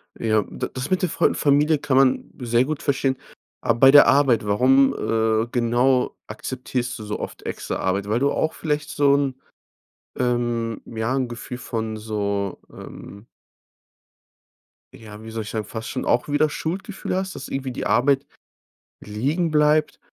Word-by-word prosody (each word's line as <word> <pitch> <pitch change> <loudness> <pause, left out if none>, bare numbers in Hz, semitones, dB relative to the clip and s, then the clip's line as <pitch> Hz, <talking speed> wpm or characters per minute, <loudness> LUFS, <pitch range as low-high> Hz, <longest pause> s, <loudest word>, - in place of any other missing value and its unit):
Ja, 110 -2 +1
d - - -4
das 130 +2 -4
mit 185 0 +1
der 180 - +1
Fa - - +2
Familie 150 +2 +3
kann 140 -2 0
man 135 -1 +3
sehr 120 +1 +2
gut 155 -1 -4
verstehen. 135 -2 0 0.4
Aber 115 - 0
bei 135 - +8
der 145 +1 +8
Arbeit, 125 -7 +3
warum, 130 +6 +4
äh, 110 0 0
genau, 125 +2 +2
akzeptierst 125 -1 -4
du - - -7
so 105 0 -4
oft - - -7
extra - - -4
Arbeit? 100 +2 -1
Weil 110 +3 +1
du 140 +2 +2
auch 155 - 0
vielleicht 150 -2 -2
so 140 -1 +3
'n 140 -2 0 0.8
ähm, 120 -2 -1
ja, 110 +2 -3
'n 130 -2 0
Gefühl 120 +1 -7
von 110 -3 -4
so, 100 -2 -3
ähm 100 +3 -11 1.7
ja, 105 -1 -12
wie 110 - -9
soll 110 -1 -4
ich 105 - -8
sagen, 110 -2 -3
fast 110 0 -6
schon 130 - -4
auch 120 +3 +1
wieder 145 +1 +2
Schuldgefühle 185 +6 -4
hast, 190 0 -3
dass 130 - -7
irgendwie 135 -1 -4
die - - -5
Arbeit 135 +4 +2 0.8
liegen 145 - -1
bleibt? 150 0 +2
125 Hz, 165 wpm, -23 LUFS, 110-140 Hz, 1.7 s, bei